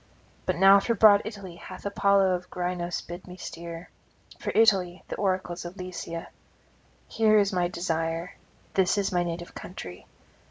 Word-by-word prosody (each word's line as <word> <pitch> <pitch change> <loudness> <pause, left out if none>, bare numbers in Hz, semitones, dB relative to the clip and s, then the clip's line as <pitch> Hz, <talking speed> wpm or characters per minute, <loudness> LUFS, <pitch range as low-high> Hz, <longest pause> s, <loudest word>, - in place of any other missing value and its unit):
But - - +1
now 195 +2 +7
for 230 +4 0
broad 205 -1 +7
Italy 195 -5 -8
hath 185 +1 -10
Apollo 200 -1 +3
of 180 0 -4
Grynos 175 -1 -3
bidden 175 +2 -9
me - - -12
steer, 170 -1 -8 0.5
for - - -4
Italy 190 -5 +3
the - - -3
oracles 185 -3 -1
of 175 +3 -8
Lycia. 170 -2 -6 0.8
Here 215 -1 +3
is 200 -1 +3
my 180 -1 +2
desire; 165 -1 -2 0.4
this 190 +1 +2
is 200 -1 0
my 175 -1 +2
native 175 0 -4
country. 90 - -9
180 Hz, 155 wpm, -27 LUFS, 175-200 Hz, 0.8 s, now